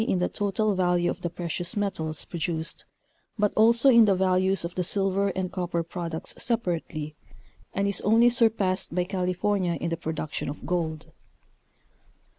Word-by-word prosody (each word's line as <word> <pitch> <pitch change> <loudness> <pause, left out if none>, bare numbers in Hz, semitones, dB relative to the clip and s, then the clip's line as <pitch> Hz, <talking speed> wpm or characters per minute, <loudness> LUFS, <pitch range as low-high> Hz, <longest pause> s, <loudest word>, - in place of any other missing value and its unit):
215 190 -4 0
the 180 - -2
total 210 +2 +1
value 175 -2 +1
of - - -8
the 175 - -2
precious 175 +4 -3
metals 160 -7 -2
produced, 165 -1 -3 0.5
but 210 -1 +1
also 235 +4 +5
in 235 -4 +7
the 200 -2 +3
values 185 0 +1
of 170 - -5
the 180 - -1
silver 195 +1 +1
and 185 -1 -2
copper 175 -2 -2
products 170 -1 -5
separately, 170 -9 -2 0.6
and 200 +1 -1
is 200 -2 +1
only 225 +3 +4
surpassed 215 -7 +1
by 180 - +2
California 180 0 -1
in 170 0 -3
the 165 - -1
production 160 -4 -4
of 145 - -8
gold. 160 -3 -3
185 Hz, 155 wpm, -26 LUFS, 170-200 Hz, 0.6 s, in